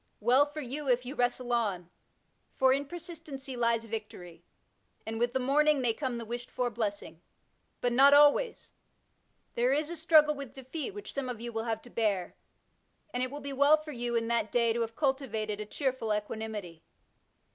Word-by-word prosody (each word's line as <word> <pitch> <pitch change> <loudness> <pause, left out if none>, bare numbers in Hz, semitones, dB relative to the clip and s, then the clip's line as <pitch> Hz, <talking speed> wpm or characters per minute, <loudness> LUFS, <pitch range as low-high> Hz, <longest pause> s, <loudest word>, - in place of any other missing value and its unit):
Well 255 +6 +4
for 300 +1 -7
you, 275 +2 -4
if 250 0 +2
you 255 - -5
wrestle 245 -2 0
on, 190 -7 -1 0.6
for 260 0 +4
in 280 +1 -1
persistency 310 -6 -7
lies 235 -1 +1
victory, 210 -6 -7 0.6
and 225 0 -4
with 240 +1 +1
the 260 - +1
morning 295 +3 +3
may 245 -3 +2
come 255 -1 -3
the 230 - -6
wished 240 +2 -6
for 245 -1 -1
blessing. 205 -6 -4 0.6
But 245 -1 +1
not 275 +3 +7
always; 295 +12 +4 0.8
there 245 +3 +2
is 305 +3 0
a - - -4
struggle 310 -2 +5
with 280 -4 -8
defeat 275 +8 -5
which 415 - -7
some 275 -2 -3
of 245 -3 -5
you 235 0 -6
will 225 0 -2
have 225 -1 -2
to 245 - -14
bear, 205 -5 -1 0.8
and 245 - -1
it 255 - 0
will 290 +2 -7
be 280 0 -5
well 285 +3 +5
for 305 0 -9
you 240 -2 -3
in 230 -1 0
that 235 -2 0
day 235 -2 +3
to 235 - -1
have 225 0 -3
cultivated 230 -7 -1
a 210 - -5
cheer 265 +3 -1
ful 225 -4 -4
equanimity. 210 -5 -4
245 Hz, 190 wpm, -30 LUFS, 225-280 Hz, 0.8 s, not